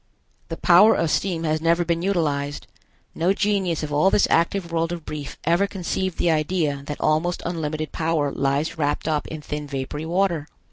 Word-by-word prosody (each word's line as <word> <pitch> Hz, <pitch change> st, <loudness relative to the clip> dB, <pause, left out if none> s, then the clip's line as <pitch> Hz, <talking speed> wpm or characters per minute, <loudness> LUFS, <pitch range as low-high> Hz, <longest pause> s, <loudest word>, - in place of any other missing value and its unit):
The -, -, -4 dB
power 200 Hz, +5 st, +6 dB
of 165 Hz, -2 st, 0 dB
steam 175 Hz, -4 st, 0 dB
has 155 Hz, -1 st, 0 dB
never 170 Hz, +1 st, +2 dB
been 170 Hz, 0 st, 0 dB
utilized. 150 Hz, -6 st, -1 dB, 0.5 s
No 175 Hz, +4 st, +1 dB
genius 195 Hz, -6 st, 0 dB
of 150 Hz, -1 st, -4 dB
all 150 Hz, +6 st, +4 dB
this 200 Hz, -, +3 dB
active 170 Hz, +1 st, +1 dB
world 165 Hz, 0 st, 0 dB
of 170 Hz, -2 st, -6 dB
Brief 145 Hz, -2 st, -6 dB
ever 175 Hz, +4 st, +2 dB
conceived 190 Hz, -1 st, -3 dB
the 170 Hz, -, +2 dB
idea 155 Hz, -2 st, 0 dB
that 150 Hz, -, -5 dB
almost 160 Hz, +3 st, 0 dB
unlimited 155 Hz, -2 st, -3 dB
power 160 Hz, -3 st, 0 dB
lies 140 Hz, +4 st, -1 dB
wrapped 145 Hz, +1 st, -1 dB
up 155 Hz, -2 st, 0 dB
in 155 Hz, -1 st, -7 dB
thin 150 Hz, 0 st, -5 dB
vapory 140 Hz, +3 st, -4 dB
water. 170 Hz, -3 st, 0 dB
165 Hz, 180 wpm, -23 LUFS, 150-175 Hz, 0.5 s, power